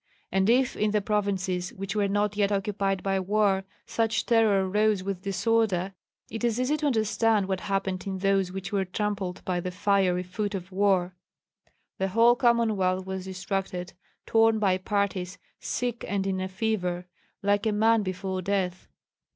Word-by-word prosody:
And 190 +2 +2
if 255 +2 +3
in 210 - +1
the 210 0 +2
provinces, 195 -3 -1
which 195 +1 -5
were 205 -1 +2
not 205 +1 0
yet 205 -1 +1
occupied 195 -1 -1
by 195 -1 +1
war, 195 0 +1 0.2
such 225 -1 0
terror 215 -5 +3
rose 210 0 +2
with 195 -2 -4
disorder, 195 -1 0 0.3
it 225 +2 -6
is 235 0 +1
easy 255 +4 +1
to 300 0 0
understand 220 -4 +2
what 190 -1 -1
happened 195 -1 -2
in 190 -1 -2
those 195 -1 +1
which 195 +1 -6
were 195 -1 +2
trampled 190 -1 -3
by 180 -1 0
the 180 - -3
fiery 185 -1 +1
foot 200 +3 -3
of 185 0 -6
war. 190 -2 +2 0.9
The 190 - +1
whole 230 +5 +5
Commonwealth 220 -7 +2
was 190 -1 -5
distracted, 185 -1 -4 0.3
torn 225 0 +4
by 190 -3 +2
parties, 200 -1 -1 0.2
sick 245 -1 -3
and 195 0 -1
in 190 -1 -1
a 185 - -2
fever, 185 -3 -2 0.4
like 205 +2 +2
a - - +2
man 220 +2 +3
before 190 -1 -3
death. 185 -1 -2
195 Hz, 165 wpm, -27 LUFS, 185-215 Hz, 0.9 s, whole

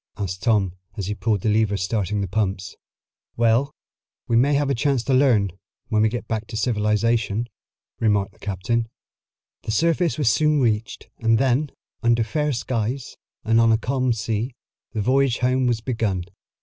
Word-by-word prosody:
asked 95 -2 -4
Tom 105 -6 +2 0.2
as 100 - -3
he 105 - -2
pulled 105 -2 -1
the 110 - 0
lever 105 -1 +2
starting 100 +1 -1
the 100 - -2
pumps. 95 -2 -2 0.6
"Well, 120 +4 +3 0.6
we 115 - +1
may 140 +5 +4
have 140 -1 +1
a - - +3
chance 135 -1 +1
to 135 - 0
learn, 120 -8 +3 0.4
when 110 -3 +2
we 110 - +4
get 120 0 -5
back 110 -1 -3
to 110 - -5
civilization," 110 0 +1 0.5
remarked 105 -3 +1
the - - -25
captain. 105 +4 -1 0.7
The - - -9
surface 165 - +1
was 145 -5 0
soon 150 +6 +3
reached, 110 -3 -1
and 115 0 +3
then, 135 +4 +1 0.3
under 115 -1 +3
fair 150 +7 -1
skies, 120 +1 -3 0.3
and 115 +1 +3
on 115 0 +4
a 110 - +4
calm 130 +2 0
sea, 115 +2 -2 0.4
the 110 -3 -2
voyage 130 +1 +2
home 130 +1 +1
was 120 -2 0
begun. 110 -7 -1
115 Hz, 170 wpm, -23 LUFS, 105-130 Hz, 0.7 s, may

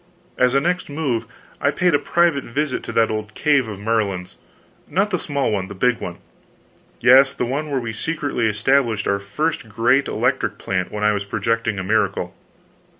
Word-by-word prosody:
As 125 +1 +2
a - - +6
next 180 +4 -1
move, 140 -6 -2 0.3
I - - +3
paid 180 -2 +1
a 145 - +4
private 165 -1 +2
visit 140 +2 -2
to - - -5
that 115 -1 +3
old 110 0 -4
cave 145 -5 +2
of 105 -3 -7
Merlin's 100 -4 -1 0.5
not 200 +3 0
the 180 - 0
small 140 -6 -1
one 100 -3 -1
the 100 - -9
big 125 +5 +1
one - - -6 0.5
" - - -35 0.3
"Yes, 135 +3 +6
the 125 - -1
one 145 +5 -3
where 140 -2 0
we 115 -2 -4
secretly 145 -3 -1
established 110 0 +1
our 100 - +1
first 120 +5 -3
great 115 +6 +2
electric - - 0
plant 90 -1 -2
when 105 0 -4
I 105 - +4
was 100 -1 -3
projecting 115 +1 -1
a 95 - -3
miracle." 95 -3 0
120 Hz, 190 wpm, -21 LUFS, 105-145 Hz, 0.5 s, a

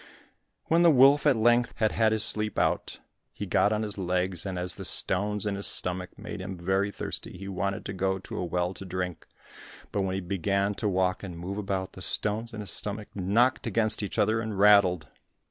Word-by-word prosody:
When 165 +1 +3
the 170 - +7
wolf 140 +1 +6
at 140 - +5
length 120 +2 +2
had 110 -1 +2
had 110 -1 +2
his 110 -1 0
sleep 105 -1 -2
out, - - 0 0.3
he - - -6
got 105 - +2
on 110 0 0
his 105 -1 -4
legs, 90 0 -1
and 95 -1 -4
as 90 0 0
the - - -8
stones 105 +2 +1
in 105 - -1
his 100 0 -4
stomach 90 0 -2
made 105 -2 -7
him 95 0 -6
very 95 +3 0
thirsty, 100 - -5
he 95 +2 -8
wanted 100 0 -3
to 100 - -4
go 95 0 0
to 95 - -8
a - - -2
well 90 +1 -1
to 95 - -8
drink. 90 -2 -5 0.6
But 100 - -1
when 95 -1 -1
he 95 - -2
began 100 +2 0
to 105 +1 -2
walk 95 0 0
and 90 -4 -7
move 95 +4 -5
about, 95 -2 -3
the 95 - -11
stones 110 +4 0
in 110 -2 -6
his 100 -5 -4
stomach 105 0 0
knocked 110 +7 +1
against 110 0 +1
each 100 - -5
other 110 +2 +2
and 110 -3 -4
rattled. 100 -4 +5
100 Hz, 215 wpm, -27 LUFS, 95-110 Hz, 0.6 s, the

